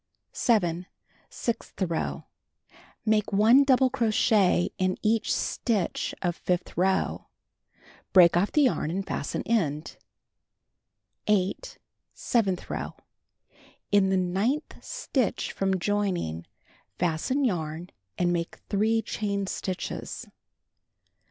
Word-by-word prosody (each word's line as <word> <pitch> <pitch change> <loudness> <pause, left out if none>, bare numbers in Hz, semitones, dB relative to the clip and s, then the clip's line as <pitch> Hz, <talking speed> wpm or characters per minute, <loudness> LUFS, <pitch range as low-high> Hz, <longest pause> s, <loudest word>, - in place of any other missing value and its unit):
7. 180 -6 +1 0.4
Sixth 235 - -4
row: 170 -4 -2 0.8
Make 215 -1 +2
1 220 +7 +6
double 260 -1 +4
crochet 215 -7 +2
in 185 0 +1
each 220 +1 +1
stitch 210 -7 -1
of 175 -2 0
fifth 180 0 -2
row. 190 +2 0 0.8
Break 175 -3 +7
off 180 +4 +2
the 300 - +4
yarn 245 - +1
and 190 +3 -2
fasten 140 - -3
end. 160 -10 -1 1.3
8. 210 - 0 0.4
Seventh 200 -7 0
row: - - -4 1.0
In 200 -2 +4
the 190 - +2
ninth 195 +11 -1
stitch 280 - -1
from 190 -1 0
joining, 180 - -1 0.5
fasten 175 - 0
yarn 170 -4 -2 0.3
and 175 0 +2
make 170 -1 -2
3 220 +2 +2
chain 200 -1 -2
stitches. 185 -1 -4
195 Hz, 100 wpm, -27 LUFS, 175-225 Hz, 1.3 s, Break